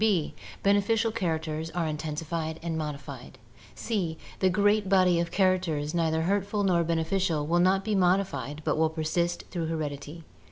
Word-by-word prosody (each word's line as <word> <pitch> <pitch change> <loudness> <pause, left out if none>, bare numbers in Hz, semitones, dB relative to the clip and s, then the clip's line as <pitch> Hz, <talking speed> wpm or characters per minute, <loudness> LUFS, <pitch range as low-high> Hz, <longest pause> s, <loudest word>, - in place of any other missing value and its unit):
b. 195 -8 +2 0.3
Beneficial 205 +3 +3
characters 160 -5 -2
are 175 -2 0
intensified 160 +1 -3
and 170 -1 -2
modified. 140 -4 -6 0.4
c. 185 -8 -2 0.2
The 190 - +3
great 205 +1 +2
body 185 -3 +4
of 170 0 -1
characters 175 -6 +1
neither 160 -1 +1
hurtful 205 +3 0
nor 175 -3 +3
beneficial 165 -1 0
will 170 +3 +2
not 190 +2 +3
be 215 - 0
modified 175 -7 +1
but - - +1
will 160 0 +3
persist 170 +2 -1
through 170 -3 -2
heredity. 155 0 -4
170 Hz, 150 wpm, -28 LUFS, 155-190 Hz, 0.4 s, body